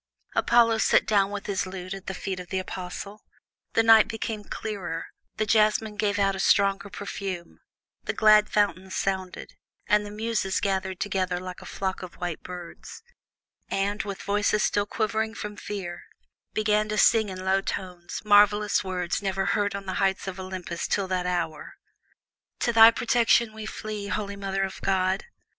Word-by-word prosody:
Apollo 230 -2 +4
sat - - +4
down 200 -2 +3
with 205 -1 -5
his 190 -2 -1
lute 185 0 -6
at 195 -1 -9
the 195 - -3
feet 190 0 -4
of 180 - -8
the 190 - -3
Apostle. 185 +2 -6 0.5
The 225 - +4
night 225 -1 +7
became 225 -2 -4
clearer, 190 -6 -5 0.3
the 215 - +1
jasmine 215 0 +2
gave 205 0 0
out 195 -1 +2
a - - -6
stronger 200 0 +3
perfume, 195 -3 -6 0.5
the - - 0
glad 215 -1 +5
fountains 190 -2 0
sounded, 190 -2 -3 0.3
the 210 0 +2
Muses 210 -2 -1
gathered 190 -1 -1
together 185 -3 -1
like 185 0 -8
a - - -10
flock 190 -1 -3
of 185 -2 -9
white 175 -2 -4
swans, 180 - -9 0.7
and, 200 +2 0
with 200 -2 -6
voices 205 +1 +1
still 205 0 +1
quivering 220 +1 -1
from 210 -2 -6
fear, 190 -4 -6 0.5
began 215 0 +1
to 215 - -2
sing 220 -1 +4
in 185 0 -7
low 190 +1 +3
tones 180 -3 -5
marvellous 205 0 +4
words 180 -2 -2
never 195 -1 -1
heard 205 -1 0
on 200 0 -6
the 190 - -3
heights 195 0 +1
of 190 0 -5
Olympus 185 -2 -5
till 195 -2 0
that 180 -1 -1
hour: 170 -4 -3 0.9
To 235 - +1
thy 225 0 +10
protection 235 -1 +2
we 220 0 -7
flee, 215 -1 -5
holy 200 -1 -3
Mother 195 -1 -2
of 190 - -5
God. 190 0 +1
200 Hz, 165 wpm, -26 LUFS, 185-210 Hz, 0.9 s, thy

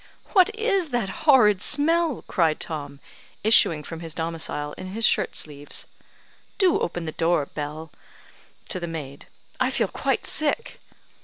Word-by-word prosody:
"What 370 -2 +6
is 400 -7 0
this 240 -6 -1
horrid 215 -10 +4
smell?" 325 +1 +1
cried 160 -3 +1
Tom, 145 -3 -6 0.4
issuing 170 -8 +6
from 165 +2 -8
his 165 -2 -5
domicile, 160 -3 -3
in 185 - -8
his 225 +1 +1
shirt - - +1
sleeves. 145 -1 -5 0.7
"Do 375 -4 +3
open 175 0 -3
the 160 - -4
door, 165 -2 +1
Bell 150 +2 -7 0.8
(to 185 - -1
the 170 - -5
maid); 145 -4 -7 0.3
I - - +2
feel - - 0
quite - - -2
sick." 310 - 0
170 Hz, 145 wpm, -24 LUFS, -, 0.8 s, What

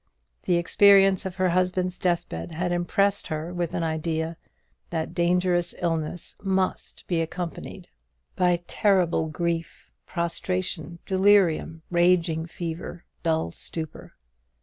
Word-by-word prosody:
The 175 - +3
experience 195 +1 +5
of 180 - -7
her 185 -1 +2
husband's 185 0 0
deathbed 170 - -2
had 180 +2 -1
impressed 195 +3 +1
her 160 +3 -4
with 175 0 -2
an 170 - -1
idea 160 +1 -2 0.5
that 160 -1 -3
dangerous 175 0 +1
illness 165 -1 -3
must 190 -1 -1
be 170 -3 0
accompanied 170 +1 -5 0.5
by 175 -1 +2
terrible 175 -6 +2 0.8
prostration, 170 0 -2
delirium, 190 -4 +3
raging 175 -2 +2
fever, 170 0 -6 0.2
dull 160 - 0
stupor. 160 - -6
175 Hz, 105 wpm, -25 LUFS, 165-185 Hz, 0.8 s, experience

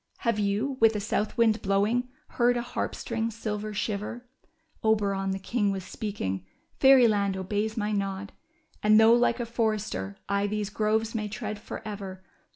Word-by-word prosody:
'' - - -35
Have 230 -2 +2
you, 210 +7 0
with 225 -1 +5
a - - 0
south 210 0 -1
wind 225 -1 +3
blowing, 210 +6 +1 0.2
heard 245 0 +2
a 240 - -1
harp. 245 - -3
string's 230 -1 -3
silver 215 -1 -3
shiver? 210 +4 -3 0.6
Oberon, 200 -3 +1
the 190 - -1
king, 205 +2 0
was 190 -1 -4
speaking: 185 - -4 0.4
'^Fairy 265 -3 +7
land 200 -3 +1
obeys 205 +4 -2
my 210 -1 0
nod. 200 -1 -2 0.5
And, 215 +1 +6
though 220 +1 +7
like 240 0 +3
a 240 - -1
forester 215 - -2
I 200 +1 +1
these 210 0 -2
groves 220 +1 0
may 215 -2 -2
tread 215 0 -5
forever. 200 -3 -7
210 Hz, 165 wpm, -27 LUFS, 200-225 Hz, 0.6 s, ^Fairy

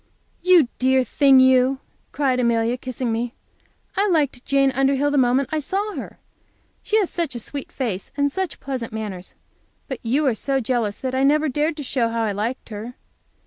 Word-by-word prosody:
"You 355 -6 +5
dear 260 0 +3
thing, 270 +2 +5
you!" 260 +1 +4 0.3
cried 265 -3 0
Amelia, 235 -1 +1
kissing 255 -1 -4
me. 235 +2 -2 0.6
"I 405 +1 +2
liked 285 -7 +1
Jane 275 -1 +2
Underhill 270 +2 +1
the 290 - +1
moment 255 +2 +2
I 310 - 0
saw 395 +7 -2
her. - - -7 0.6
She 435 - +1
has 405 -5 +1
such 330 -7 -2
a - - -3
sweet 280 +4 -6
face 215 -8 -4
and 285 0 +1
such 375 0 -3
pleasant 260 -4 -5
manners. 205 -5 -6 0.5
But 265 -4 -5
you 265 +6 0
are 260 - +3
so 270 +5 -1
jealous 230 -4 -1
that 260 -1 -3
I 260 - +1
never 300 +3 +3
dared 300 +4 -1
to 295 - -5
show 250 -3 0
how 230 0 -1
I 215 - 0
liked 220 +7 -4
her. 225 +3 -7
260 Hz, 185 wpm, -22 LUFS, 235-285 Hz, 0.6 s, You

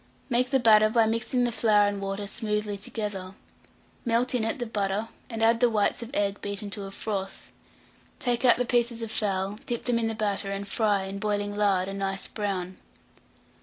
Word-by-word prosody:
Make 250 +1 +3
the 270 - +4
batter 215 -2 +6
by 225 0 +4
mixing 230 +3 0
the 240 - +1
flour 210 -3 +4
and 205 -1 -2
water 195 +1 -3
smoothly 210 -1 -2
together; 195 -2 -5 0.7
melt 240 +1 +1
in 245 -3 +1
it 225 - -1
the 245 - -3
butter, 210 0 -1 0.2
and 225 -2 -2
add 230 +1 +4
the 245 0 +4
whites 215 0 +1
of 235 - -6
egg 200 -1 0
beaten 200 0 -4
to 200 -1 -5
a 195 - -7
froth; 195 -1 -5 0.7
take 245 0 0
out 245 - +6
the 250 - 0
pieces 235 -1 +1
of 225 - -5
fowl, 200 -1 -1
dip 240 -1 -3
them 240 -2 +2
in 225 - 0
the 225 - -2
batter, 205 -2 -1
and 200 0 -4
fry, 205 -2 +1
in 195 +1 -5
boiling 205 -1 -1
lard, 195 -3 +2
a 195 - -4
nice 195 -1 -2
brown. 190 -3 -3
210 Hz, 200 wpm, -27 LUFS, 200-230 Hz, 0.7 s, batter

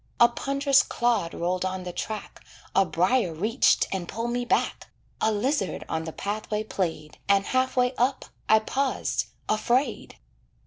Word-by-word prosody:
A 235 - +8
pond'rous 275 +3 +2
clod 230 -8 0
rolled 180 +2 -1
on 185 0 -3
the 180 -1 -6
track, 215 +2 -6 0.3
A 195 +1 +5
briar 180 +5 +2
reached 220 +10 +3
and 185 -3 -3
pulled 230 +5 -3
me 245 0 -1
back, - - 0 0.3
A 220 - +3
lizzard 215 0 -1
on 160 0 -2
the 160 - -4
pathway 210 +3 -3
played, 170 -7 -4
And 200 0 +4
half 255 0 0
way 250 +1 +3
up 255 +3 +1 0.2
I 220 - +7
paused 265 +5 -1 0.2
afraid. 240 +6 0
215 Hz, 150 wpm, -26 LUFS, 185-250 Hz, 0.3 s, A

